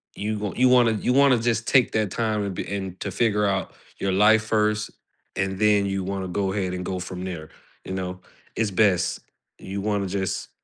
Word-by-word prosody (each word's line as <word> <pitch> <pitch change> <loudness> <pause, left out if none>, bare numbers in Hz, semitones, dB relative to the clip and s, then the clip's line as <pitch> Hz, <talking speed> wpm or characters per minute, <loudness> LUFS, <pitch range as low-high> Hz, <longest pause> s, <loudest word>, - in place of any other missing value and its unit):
you 105 +1 -3
gonna 105 -3 -4
you 130 0 +5
wanna 120 -2 +5
you 125 +4 0
wanna 140 -2 +5
just 115 0 -1
take 130 -3 +4
that 110 -3 0
time 110 -1 -1
to 100 - -2
be 95 - -4
and 95 -2 -5
to 100 - -3
figure 105 0 +1
out 95 -1 -1 0.3
your 100 - 0
life 105 +3 +5
first, 105 -1 0 0.5
and 95 0 -2
then 105 -2 +4
you 95 -1 -2
wanna 95 0 -3
go 95 +1 -1
ahead 95 -3 -2
and 90 - -4
go 95 0 -3
from 90 0 -6
there, 80 -4 -6 0.4
you 95 - -5
know? 90 -1 -4 0.4
It's 110 -2 0
best. 95 -2 +2 0.4
You 100 +1 -5
wanna 100 -2 -1
just 95 0 -3
100 Hz, 205 wpm, -24 LUFS, 95-110 Hz, 0.5 s, you